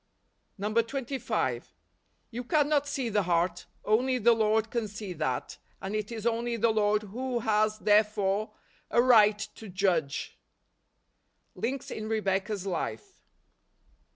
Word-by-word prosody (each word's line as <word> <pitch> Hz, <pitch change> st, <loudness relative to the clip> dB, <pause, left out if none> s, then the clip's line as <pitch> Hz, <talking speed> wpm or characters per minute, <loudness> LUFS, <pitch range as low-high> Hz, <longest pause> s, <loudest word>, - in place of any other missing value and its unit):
25. 230 Hz, +6 st, -1 dB, 0.6 s
You 240 Hz, +2 st, -5 dB
cannot 290 Hz, +1 st, +2 dB
see 270 Hz, -3 st, -2 dB
the 210 Hz, -1 st, +2 dB
heart. 175 Hz, 0 st, 0 dB, 0.2 s
Only 250 Hz, +5 st, +2 dB
the 235 Hz, 0 st, +5 dB
Lord 220 Hz, 0 st, +1 dB
can 235 Hz, -3 st, -1 dB
see 205 Hz, -2 st, -7 dB
that, 150 Hz, -6 st, -3 dB, 0.2 s
and 195 Hz, +2 st, -4 dB
it 215 Hz, +1 st, -3 dB
is 225 Hz, -1 st, -6 dB
only 235 Hz, 0 st, 0 dB
the 230 Hz, +1 st, +3 dB
Lord 210 Hz, 0 st, +2 dB
who 240 Hz, +4 st, -3 dB
has, 215 Hz, 0 st, +2 dB
therefore, 210 Hz, -1 st, +2 dB, 0.4 s
a -, -, +2 dB
right 220 Hz, -4 st, +6 dB, 0.2 s
to 220 Hz, -, -11 dB
judge. 180 Hz, -7 st, -1 dB, 1.1 s
Links 260 Hz, +3 st, -4 dB
In 215 Hz, 0 st, -5 dB
Rebecca's 200 Hz, -2 st, -1 dB
Life. 165 Hz, -, -4 dB
215 Hz, 125 wpm, -29 LUFS, 200-235 Hz, 1.1 s, right